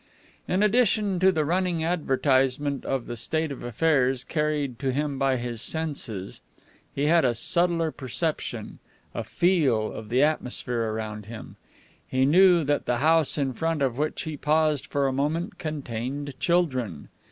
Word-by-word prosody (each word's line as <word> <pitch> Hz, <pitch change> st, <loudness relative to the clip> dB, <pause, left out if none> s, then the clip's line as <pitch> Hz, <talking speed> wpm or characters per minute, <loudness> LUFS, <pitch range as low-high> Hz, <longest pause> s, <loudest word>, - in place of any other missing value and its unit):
In 185 Hz, +3 st, +1 dB
addition 210 Hz, -3 st, +2 dB
to 190 Hz, +1 st, +5 dB
the 155 Hz, -4 st, 0 dB
running 175 Hz, 0 st, 0 dB
advertisement 140 Hz, -4 st, +1 dB
of 135 Hz, -3 st, -1 dB
the 120 Hz, -, -5 dB
state 155 Hz, +6 st, -2 dB
of 140 Hz, -, -7 dB
affairs 130 Hz, -1 st, +1 dB
carried 150 Hz, -5 st, -1 dB
to 135 Hz, -1 st, 0 dB
him 140 Hz, 0 st, -2 dB
by 135 Hz, -1 st, +2 dB
his 120 Hz, -2 st, -4 dB
senses, 140 Hz, -, -4 dB, 0.5 s
he 140 Hz, -, 0 dB
had 165 Hz, +2 st, +4 dB
a 120 Hz, -2 st, +2 dB
subtler 165 Hz, +5 st, +1 dB
perception, 150 Hz, +5 st, -4 dB, 0.3 s
a -, -, -3 dB
feel, 145 Hz, -12 st, +1 dB
of 110 Hz, -1 st, -8 dB
the 125 Hz, +4 st, +3 dB
atmosphere 125 Hz, -6 st, -1 dB
around 105 Hz, -1 st, -5 dB
him. 115 Hz, -1 st, -9 dB, 0.5 s
He 130 Hz, 0 st, +1 dB
knew 175 Hz, +3 st, +6 dB
that 145 Hz, 0 st, -1 dB
the 125 Hz, -, +1 dB
house 160 Hz, +3 st, +3 dB
in 135 Hz, -3 st, 0 dB
front 160 Hz, 0 st, -1 dB
of 130 Hz, -1 st, -1 dB
which 150 Hz, +1 st, -1 dB
he 155 Hz, -2 st, -5 dB
paused 155 Hz, -1 st, +1 dB
for 140 Hz, -1 st, 0 dB
a 135 Hz, -, +1 dB
moment, 160 Hz, +9 st, -2 dB
contained 140 Hz, -2 st, -4 dB
children. 130 Hz, -, 0 dB
145 Hz, 155 wpm, -26 LUFS, 125-160 Hz, 0.5 s, knew